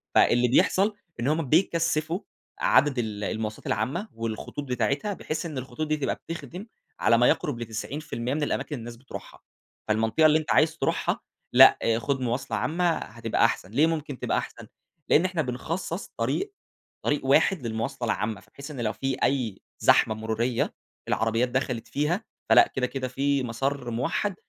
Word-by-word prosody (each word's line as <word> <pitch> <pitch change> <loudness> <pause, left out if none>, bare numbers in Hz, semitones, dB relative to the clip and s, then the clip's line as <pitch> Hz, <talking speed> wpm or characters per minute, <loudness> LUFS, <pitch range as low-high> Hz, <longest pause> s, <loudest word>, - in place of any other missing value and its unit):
فاللي 120 +1 +5
بيحصل، 195 - +3 0.2
إن 120 - -1
هم 155 -2 0
بيكثّفوا 165 -1 +2 0.4
عدد 145 - +4
ال 105 -3 -3
المواصلات 110 +1 -3
العامة، 130 - -1
والخطوط 115 +5 -4
بتاعتها، 140 - 0
بحيث 160 -2 -4
إن 155 -4 -5
الخطوط 130 +4 -4
دي 155 0 +1
تبقى 140 - -1
بتخدم 180 +5 -6 0.3
على 115 - +4
ما 120 - +5
يَقرُب 135 -6 +1
ل90% 120 +2 -4
من 150 0 -1
الأماكن - - -2
اللي 125 - -6
الناس 120 +1 -8
بتروحها. 130 +2 -10 0.5
فالمنطقة 110 +8 +2
اللي 155 0 +6
أنت 150 -6 -3
عايز - - +3
تروحها - - 0 0.3
،لأ - - +9 0.2
خُد 135 +3 -1
مواصلة 125 +2 -1
عامة 175 +2 +1
هتبقى - - 0
أحسن. 95 - -1
ليه 145 +8 +4
ممكن 150 -5 -3
تبقى - - 0
أحسن؟ - - -5 0.4
لإن 165 - +5
إحنا 180 -3 0
بنخصّص 165 +8 -4
طريق، 400 +1 -1 0.5
طريق 145 -2 0
واحد 140 0 +3
للمواصلة 120 +3 -3
العامة. 105 -1 -2
بحيث 140 +2 -9
إن 130 -5 -5
لو 110 -1 0
في 135 +4 -2
أي 120 -8 0 0.2
زحمة 110 - +4
مرورية 110 +2 -1 0.3
العربيات 115 +2 +1
دخلت 125 -2 -2
فيها، 165 +9 0 0.3
فلأ - - +7
كده، 125 -1 +1
كده 130 -1 -3
في 135 +1 0
مسار 135 +3 -2
مُوحّد 170 - -1
135 Hz, 160 wpm, -26 LUFS, 115-155 Hz, 0.5 s, لأ